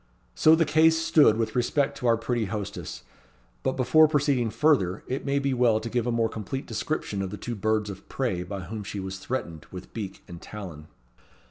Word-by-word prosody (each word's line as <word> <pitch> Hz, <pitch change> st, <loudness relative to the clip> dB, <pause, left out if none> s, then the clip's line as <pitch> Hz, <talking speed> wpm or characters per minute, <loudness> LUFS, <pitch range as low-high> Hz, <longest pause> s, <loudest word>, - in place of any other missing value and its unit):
So 155 Hz, -, +6 dB
the 165 Hz, 0 st, +2 dB
case 160 Hz, +2 st, +4 dB
stood 150 Hz, -8 st, +4 dB
with 115 Hz, +2 st, -2 dB
respect 135 Hz, +3 st, +1 dB
to 125 Hz, -, -1 dB
our 115 Hz, -1 st, +4 dB
pretty 115 Hz, 0 st, -1 dB
hostess; 100 Hz, -1 st, -5 dB, 0.6 s
but, 130 Hz, -, 0 dB
before 145 Hz, +5 st, +5 dB
proceeding 140 Hz, -6 st, +1 dB
further, 105 Hz, -, +2 dB
it 135 Hz, +2 st, -4 dB
may 140 Hz, 0 st, +1 dB
be 140 Hz, -1 st, 0 dB
well 120 Hz, -3 st, +3 dB
to 115 Hz, +1 st, -6 dB
give 120 Hz, -1 st, 0 dB
a -, -, +1 dB
more 115 Hz, -1 st, +2 dB
complete 110 Hz, +5 st, -5 dB
description 105 Hz, -10 st, -3 dB
of 95 Hz, -, -3 dB
the 105 Hz, -, -6 dB
two 120 Hz, +5 st, -5 dB
birds 110 Hz, 0 st, 0 dB
of 95 Hz, -, -12 dB
prey 120 Hz, -10 st, -1 dB
by 95 Hz, +2 st, -5 dB
whom 105 Hz, +4 st, -6 dB
she 100 Hz, 0 st, -5 dB
was 95 Hz, 0 st, -5 dB
threatened 85 Hz, -9 st, -5 dB
with 90 Hz, 0 st, -10 dB
beak 105 Hz, -4 st, -6 dB
and 85 Hz, -1 st, -10 dB
talon. 85 Hz, -8 st, -9 dB
115 Hz, 205 wpm, -26 LUFS, 100-135 Hz, 0.6 s, So